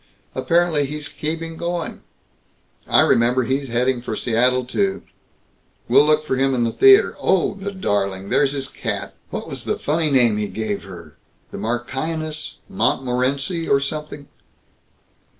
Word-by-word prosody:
Apparently 155 +2 +1
he's 150 +1 -5
keeping 165 +2 -4
going. 170 0 -4 0.9
I - - +5
remember; 120 +2 +3
he's 135 +3 -1
headed 120 +1 0
for - - -3
Seattle, 125 +2 +2
too. 195 +9 -1 0.8
We'll 145 - +5
look 155 0 +3
for 130 -3 -1
him 135 0 +2
in 120 - +1
the 115 - 0
theater. 400 - +6
Oh, 190 -3 +2
the 200 0 -6
darling, 100 - -2
there's 140 -1 +3
his 135 -2 -3
cat! - - -4 0.2
What - - -5
was - - -6
the - - -1
funny 155 +1 0
name 120 -6 +3
he 105 0 -1
gave 110 -2 -3
her 85 -6 -12 0.3
the - - -7
Marchioness 150 +7 -3
Montmorency 135 -2 0
or 140 - +4
something?" 145 0 -5
135 Hz, 145 wpm, -21 LUFS, 120-160 Hz, 0.9 s, theater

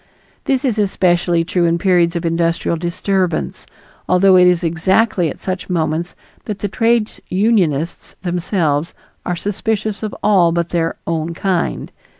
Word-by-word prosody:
This 270 0 0
is 225 -5 0
especially 175 -4 +2
true 175 0 0
in 170 0 +2
periods 175 -1 +2
of 170 0 -2
industrial 165 0 0
disturbance, 175 +1 -2 0.4
although 185 +1 +5
it 180 0 +6
is 180 0 +2
exactly 180 +3 +1
at - - -7
such 185 0 -5
moments 165 0 -1 0.3
that 210 -3 -4
the 205 - -3
trades 225 +1 0
unionists 180 -7 0
themselves 175 -4 -1 0.3
are 180 - 0
suspicious 210 +2 -2
of 215 -1 -4
all 185 -5 +4
but 170 0 -1
their 165 -1 -1
"own 165 0 -2
kind." 185 -1 -1
180 Hz, 145 wpm, -18 LUFS, 170-195 Hz, 0.4 s, it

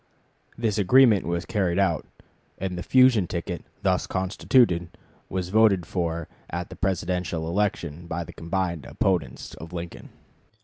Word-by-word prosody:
This 110 -2 0
agreement 110 0 +5
was 85 0 -1
carried 95 -5 0
out, 95 -5 +1 0.5
and 95 -1 -3
the 90 - -4
fusion 130 -4 +5
ticket 85 -1 -4 0.2
thus - - +1
constituted 95 -1 +2 0.4
was 90 -1 -3
voted 105 -4 +4
for 85 -2 -2 0.2
at 85 +1 -4
the - - -7
Presidential 90 -3 -1
election 85 -3 -1
by 85 +1 -3
the - - -11
combined 85 -2 -2
opponents 90 -10 -1
of 80 +2 -10
Lincoln. 85 -1 -7
90 Hz, 135 wpm, -25 LUFS, 85-100 Hz, 0.5 s, agreement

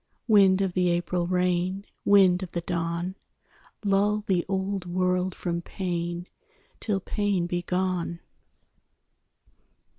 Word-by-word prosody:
Wind 195 -3 +5
of 190 -2 0
the 180 -1 +2
April 175 0 0
rain, 180 +2 0 0.2
Wind 190 -3 +5
of 185 - -7
the 170 - -1
dawn, 170 +1 -2 0.7
Lull 205 +1 +2
the 180 -3 +1
old 190 -1 -2
world 180 +1 0
from 170 -1 -3
pain 175 -1 -3 0.5
Till 205 -3 -1
pain 200 -2 -1
be 175 0 -2
gone. 180 -1 -1
180 Hz, 115 wpm, -26 LUFS, 175-195 Hz, 0.7 s, Wind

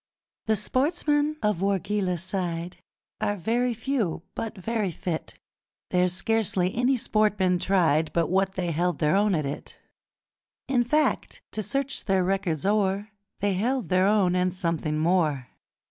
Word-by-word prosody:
The 220 - +3
sportsmen 295 - 0
of 210 -4 +1
Wargeilah 195 -1 0
side 175 -1 -3 0.4
Are 205 -1 0
very 235 +6 0
few 225 - -2
but 225 -2 -5
very 215 +1 -1
fit: 165 -1 -5 0.5
There's 180 0 +3
scarcely 190 -2 0
any 250 +3 +2
sport 215 -2 +1
been 180 -2 +2
tried 165 -5 +2
But 170 0 0
what 190 0 +2
they 180 -3 -2
held 175 +3 0
their 150 +3 +2
own 205 -1 +3
at 150 -3 -1
it 140 - -6 0.9
In 255 -3 +2
fact, 300 +6 0
to 215 - -3
search 275 +4 -1
their 190 -2 +2
records 180 -5 -1
o'er, 200 0 +1 0.3
They 205 0 +2
held 230 - -1
their 185 +1 +3
own 200 -4 +3
and 180 0 +2
something 165 -4 -1
more. 155 - +1
195 Hz, 145 wpm, -26 LUFS, 175-220 Hz, 0.9 s, The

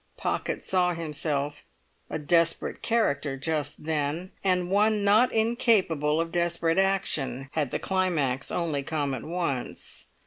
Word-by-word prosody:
Pocket - - -2
saw 180 -2 +2
himself 150 -3 -2 0.5
a - - -2
desperate 165 +2 +1
character 145 - 0
just 150 +1 -2
then, 155 +3 -2
and 180 -2 +1
one 210 +1 +3
not 215 +5 +5
incapable 210 - +2
of 165 0 -1
desperate 170 0 +1
action 150 -9 0
had 150 -4 -1
the - - -1
climax 155 -9 0
only 160 -5 -1
come 145 -1 -2
at 130 - -5
once. 165 -7 -2
165 Hz, 130 wpm, -27 LUFS, 145-185 Hz, 0.5 s, not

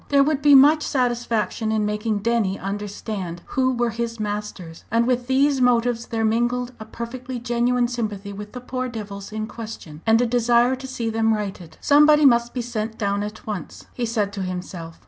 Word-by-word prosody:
There 280 -1 +5
would 290 -1 0
be 290 -1 +7
much 295 +3 +7
satisfaction 235 -5 -1
in 215 -1 +1
making 210 0 -1
Denny 225 -5 +1
understand 195 -2 -5
who 260 -1 +1
were 240 -1 0
his 230 0 -4
masters. 205 -5 -5
And 230 +1 +2
with 245 0 0
these 270 +1 +3
motives 240 -1 +2
there 225 -1 -1
mingled 240 +2 0
a 220 - -7
perfectly 245 +3 -6
genuine 240 +1 +1
sympathy 210 -4 -4
with 210 +1 -9
the 250 - -7
"poor 255 0 -3
devils" 205 -3 -7
in 215 0 -3
question, 215 -10 -9
and 225 +1 +5
a 245 - +3
desire 240 +1 +3
to 265 +1 -8
see 235 -3 -3
them 225 0 +2
righted. 190 -6 -6
"Somebody 300 +1 +6
must 240 -2 +4
be 245 - -3
sent 225 -2 -4
down 200 -1 0
at 210 +1 -6
once," 210 -4 -6
he 240 -2 -2
said 210 -3 -1
to 200 - -4
himself. 180 -3 -6
230 Hz, 185 wpm, -23 LUFS, 210-245 Hz, -, be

